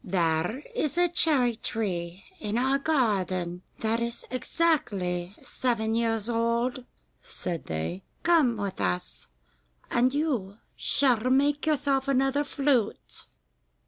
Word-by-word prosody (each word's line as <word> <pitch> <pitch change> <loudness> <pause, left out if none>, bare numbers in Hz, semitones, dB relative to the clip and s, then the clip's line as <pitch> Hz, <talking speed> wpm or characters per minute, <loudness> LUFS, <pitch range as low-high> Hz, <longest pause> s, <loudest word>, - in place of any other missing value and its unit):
'There 175 - 0
is 310 - -1
a 355 0 +4
cherry 280 -8 +2
tree 185 -5 -3 0.2
in 210 +1 -2
our 265 +3 +2
garden 190 - 0 0.2
that 225 +1 +1
is 235 0 -2
exactly 200 - 0
seven 225 -3 0
years 225 -2 0
old,' 235 +2 0 0.4
said 170 -2 -4
they. 80 +3 -3 0.2
'Come 310 -9 +4
with 200 - -4
us, 90 -12 -2 0.6
and 250 +2 +3
you 255 -10 -1 0.2
shall 250 -3 +2
make 285 +3 +2
yourself 280 -3 +1
another 270 +1 +2
flute. 275 -6 -1
235 Hz, 110 wpm, -27 LUFS, 190-275 Hz, 0.6 s, a